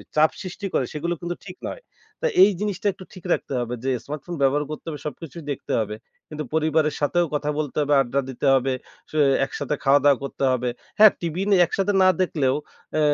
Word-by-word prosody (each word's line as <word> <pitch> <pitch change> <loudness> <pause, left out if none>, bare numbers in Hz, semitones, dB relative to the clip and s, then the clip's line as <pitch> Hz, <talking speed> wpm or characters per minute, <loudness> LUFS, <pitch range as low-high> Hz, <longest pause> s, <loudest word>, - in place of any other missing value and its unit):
চাপ 155 +1 +5
সৃষ্টি 190 +2 -6
করে 130 - +2
সেগুলো 170 +3 -2
কিন্তু 175 0 -3
ঠিক 180 -1 -9
নয়। - - -6 0.4
তো - - -1 0.2
এই 195 - +7
জিনিসটা 205 0 -2
একটু 185 - -12
ঠিক 185 -4 -12
রাখতে - - -3
হবে। 120 0 -3
যে 135 - +1
স্মার্টফোন 150 +4 -6
ব্যবহার 140 +2 +3
করতে 155 - -7
হবে 150 -2 -6
সবকিছুই 160 +2 -8
দেখতে 140 - -5
হবে। 105 0 -4 0.3
কিন্তু 155 0 -5
পরিবারের 155 -1 +2
সাথেও 175 +4 +2
কথা 150 0 -1
বলতে 150 -3 -3
হবে, 145 0 +1
আড্ডা 135 +2 0
দিতে 130 +2 -4
হবে, 135 0 +1 0.4
স - - -22 0.3
একসাথে 145 +1 -3
খাওয়া-দাওয়া 140 0 +4
করতে 140 0 -4
হবে। 125 -1 0 0.3
হ্যাঁ, 215 -1 +10
টিভি 170 +1 -2
নিয়ে 195 -3 +5
একসাথে 195 +4 0
না 185 - +7
দেখলেও 140 -7 +1 0.4
আ - - +3
150 Hz, 195 wpm, -23 LUFS, 140-175 Hz, 0.4 s, হ্যাঁ